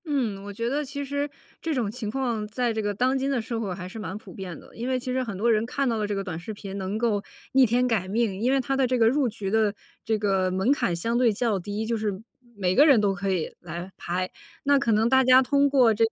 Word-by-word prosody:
嗯， 240 Hz, -10 st, -1 dB
我 205 Hz, -, -7 dB
觉 230 Hz, +3 st, -3 dB
得 285 Hz, +4 st, 0 dB
其 285 Hz, 0 st, -5 dB
实 285 Hz, +1 st, -2 dB, 0.3 s
这 325 Hz, -, -1 dB
种 235 Hz, -5 st, 0 dB
情 220 Hz, -2 st, -5 dB
况 235 Hz, -3 st, -2 dB
在 235 Hz, +2 st, -1 dB
这 220 Hz, -, -1 dB
个 205 Hz, -1 st, -1 dB
当 255 Hz, +6 st, +1 dB
今 270 Hz, +1 st, -1 dB
的 270 Hz, -3 st, +1 dB
社 230 Hz, +1 st, -4 dB
会 200 Hz, -4 st, -3 dB
还 180 Hz, 0 st, -7 dB
是 205 Hz, +5 st, -8 dB
蛮 205 Hz, -2 st, -5 dB
普 200 Hz, -4 st, -12 dB
遍 185 Hz, -2 st, -7 dB
的。 -, -, -17 dB
因 235 Hz, +2 st, -4 dB
为 255 Hz, -1 st, +1 dB
其 255 Hz, +1 st, -4 dB
实 260 Hz, 0 st, 0 dB
很 215 Hz, -6 st, -5 dB
多 230 Hz, +4 st, +2 dB
人 215 Hz, -1 st, +3 dB
看 275 Hz, +3 st, -1 dB
到 230 Hz, -2 st, +1 dB
了 210 Hz, -1 st, -1 dB
这 205 Hz, -, -2 dB
个 195 Hz, -, -2 dB
短 180 Hz, -4 st, -5 dB
视 195 Hz, +6 st, -6 dB
频 200 Hz, -1 st, -8 dB
能 195 Hz, +2 st, -3 dB
够 220 Hz, -3 st, 0 dB, 0.3 s
逆 265 Hz, 0 st, +6 dB
天 245 Hz, +2 st, +2 dB
改 215 Hz, -6 st, 0 dB
命， 205 Hz, -1 st, 0 dB
因 250 Hz, +3 st, +2 dB
为 270 Hz, -, +3 dB
它 270 Hz, +1 st, -1 dB
的 265 Hz, -1 st, +2 dB
这 255 Hz, 0 st, +1 dB
个 225 Hz, -2 st, +5 dB
入 265 Hz, +1 st, +2 dB
局 210 Hz, -3 st, -5 dB
的 215 Hz, -2 st, +2 dB, 0.3 s
这 220 Hz, -1 st, 0 dB
个 195 Hz, -3 st, +1 dB
门 190 Hz, +7 st, +1 dB
槛 190 Hz, -11 st, +1 dB
相 230 Hz, +8 st, -1 dB
对 245 Hz, -2 st, +4 dB
较 215 Hz, -1 st, 0 dB
低， 205 Hz, +4 st, -4 dB
就 230 Hz, +1 st, 0 dB
是 210 Hz, -3 st, -2 dB, 0.4 s
每 185 Hz, -2 st, +1 dB
个 290 Hz, -, +7 dB
人 275 Hz, -7 st, +6 dB
都 205 Hz, -2 st, +2 dB
可 200 Hz, 0 st, -3 dB
以 180 Hz, -4 st, -2 dB
来 175 Hz, +2 st, -7 dB
拍。 185 Hz, +1 st, -3 dB, 0.3 s
那 280 Hz, 0 st, +4 dB
可 240 Hz, -4 st, +1 dB
能 220 Hz, +1 st, +3 dB
大 265 Hz, +2 st, +5 dB
家 255 Hz, 0 st, +7 dB
通 280 Hz, +2 st, +3 dB
过 255 Hz, -5 st, +5 dB
这 220 Hz, +2 st, +1 dB
个 225 Hz, -, -3 dB
225 Hz, 300 characters per minute, -26 LUFS, 200-255 Hz, 0.4 s, 个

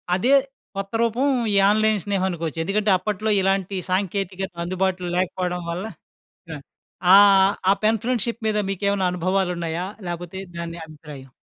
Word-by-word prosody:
అదే 245 Hz, +9 st, +2 dB, 0.4 s
కొత్త 195 Hz, 0 st, -4 dB
రూపం 235 Hz, +4 st, +1 dB, 0.3 s
ఈ -, -, +2 dB
ఆన్‌లైన్ 215 Hz, 0 st, +2 dB
స్నేహం 200 Hz, -2 st, 0 dB
అనుకోవచ్చు. 165 Hz, -2 st, -4 dB
ఎందుకంటే 205 Hz, +3 st, +1 dB
అప్పట్లో 210 Hz, +3 st, -3 dB
ఇలాంటి 195 Hz, 0 st, 0 dB
సాంకేతికత 190 Hz, 0 st, -2 dB
అందుబాటులో 185 Hz, 0 st, -1 dB
లేకపోవడం 180 Hz, -1 st, -2 dB
వల్ల 180 Hz, +4 st, -4 dB, 0.7 s
ఆ! 175 Hz, +5 st, -1 dB
ఆహ్, 195 Hz, -1 st, +6 dB, 0.2 s
ఆ -, -, +7 dB
పెన్ 220 Hz, 0 st, +2 dB
ఫ్రెండ్‌షిప్ 235 Hz, -1 st, -1 dB
మీద 215 Hz, -1 st, +1 dB
మీకేమైనా 200 Hz, -1 st, 0 dB
అనుభవాలున్నాయా? 180 Hz, -2 st, -1 dB, 0.2 s
లేపోతే 175 Hz, +1 st, -6 dB, 0.2 s
దాన్నే 170 Hz, 0 st, -6 dB
అభిప్రాయం? 150 Hz, -4 st, -12 dB
190 Hz, 130 wpm, -22 LUFS, 175-205 Hz, 0.7 s, ఆ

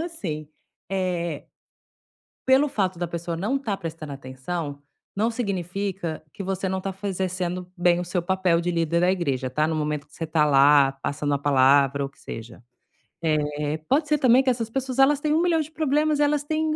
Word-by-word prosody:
assim, 180 Hz, -, -5 dB, 0.4 s
eh, 175 Hz, -5 st, -2 dB, 1.0 s
pelo 270 Hz, +3 st, +5 dB
fato 185 Hz, -6 st, -1 dB
da 175 Hz, -, -1 dB
pessoa 170 Hz, 0 st, -4 dB
não 215 Hz, +11 st, 0 dB
tá 220 Hz, -7 st, -2 dB
prestando 160 Hz, -5 st, -7 dB
atenção, 140 Hz, +3 st, -5 dB, 0.3 s
não 220 Hz, +3 st, +2 dB
significa 195 Hz, -5 st, -3 dB
que -, -, -7 dB
você 190 Hz, 0 st, -2 dB
não 190 Hz, 0 st, -1 dB
tá 195 Hz, +1 st, -3 dB
faze 195 Hz, 0 st, -4 dB
exercendo 180 Hz, -1 st, -3 dB
bem 175 Hz, 0 st, +3 dB
o -, -, -3 dB
seu 180 Hz, 0 st, -2 dB
papel 185 Hz, -1 st, +2 dB
de 175 Hz, -, 0 dB
líder 170 Hz, 0 st, +1 dB
da 180 Hz, +1 st, +4 dB
igreja 135 Hz, -8 st, -1 dB
tá, 150 Hz, +4 st, +1 dB
no 160 Hz, -, -1 dB
momento 150 Hz, -1 st, -2 dB
que -, -, -23 dB
você 165 Hz, -, -4 dB
tá 155 Hz, -1 st, +2 dB
lá, 140 Hz, 0 st, +6 dB
passando 145 Hz, 0 st, -1 dB
a -, -, 0 dB
palavra 140 Hz, 0 st, +4 dB
ou -, -, -3 dB
que 140 Hz, -, -30 dB
seja. 115 Hz, +1 st, -9 dB, 0.6 s
Eh, 150 Hz, -1 st, 0 dB
pode 295 Hz, +3 st, +2 dB
ser 300 Hz, +1 st, +3 dB
também 260 Hz, -1 st, +5 dB
que 260 Hz, -, +2 dB
essas 230 Hz, -2 st, -1 dB
pessoas 265 Hz, +1 st, -3 dB
elas 275 Hz, +1 st, +5 dB
têm 300 Hz, 0 st, 0 dB
um 320 Hz, -, +3 dB
milhão 340 Hz, -2 st, +2 dB
de 310 Hz, +1 st, -7 dB
problemas, 300 Hz, 0 st, +1 dB
elas 295 Hz, 0 st, +2 dB
têm 310 Hz, +1 st, 0 dB
180 Hz, 195 wpm, -24 LUFS, 150-240 Hz, 1.0 s, lá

